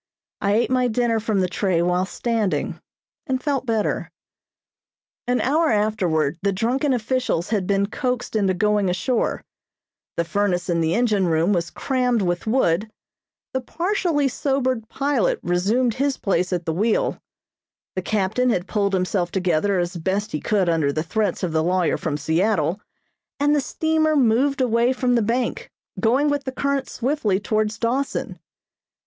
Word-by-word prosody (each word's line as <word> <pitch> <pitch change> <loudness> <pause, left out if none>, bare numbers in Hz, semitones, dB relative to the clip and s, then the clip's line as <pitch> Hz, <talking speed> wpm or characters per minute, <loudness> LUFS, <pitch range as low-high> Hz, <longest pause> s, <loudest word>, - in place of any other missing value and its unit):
I 200 0 +2
ate 235 +3 +1
my 255 -1 +3
dinner 235 -1 +1
from 215 -3 0
the 185 - +1
tray 185 -1 0
while 180 +1 +1
standing, 225 -3 -1 0.5
and 260 -2 0
felt 270 -1 -2
better. 220 -2 -1 1.2
An 250 0 +2
hour 310 +5 +2
afterward 180 -8 +1
the 200 - +1
drunken 245 +8 0
officials 245 -7 -1
had 205 -5 0
been 200 0 +2
coaxed 250 +2 -3
into 195 -3 +2
going 210 0 +2
ashore; 220 +7 -1 0.7
the 170 - +1
furnace 190 -1 0
in 170 -1 +1
the 160 +1 +1
engine 215 -6 +2
room 165 +4 +2
was 170 -2 -1
crammed 250 -5 0
with 175 +2 -2
wood; 215 -4 +1 0.6
the 260 - -1
partially 340 - 0
sobered 260 -3 -1
pilot 275 -7 0
resumed 210 +8 +1
his 275 +3 0
place 185 -2 0
at 175 -2 -2
the 160 - -1
wheel; 215 +6 0 0.8
the 185 - -1
captain 215 +6 0
had 180 -6 0
pulled 200 -1 0
himself 185 -1 0
together 185 +1 +1
as 175 0 -2
best 195 +5 -2
he 150 - -2
could 200 -4 +1
under 160 -4 +2
the 155 +2 -2
threats 200 +2 -1
of 180 - 0
the 160 0 +1
lawyer 180 0 +1
from 150 -3 -2
Seattle, 170 +3 0 0.6
and 290 +1 +3
the 290 - +2
steamer 315 +2 +1
moved 265 +2 +2
away 240 0 +2
from 255 -1 0
the 235 - +3
bank, 245 - -1 0.3
going 255 +6 +2
with 290 -2 0
the 260 - -3
current 280 +1 -1
swiftly 240 -7 0
towards 215 +1 -1
Dawson. 255 +4 -2
215 Hz, 160 wpm, -22 LUFS, 185-255 Hz, 1.2 s, my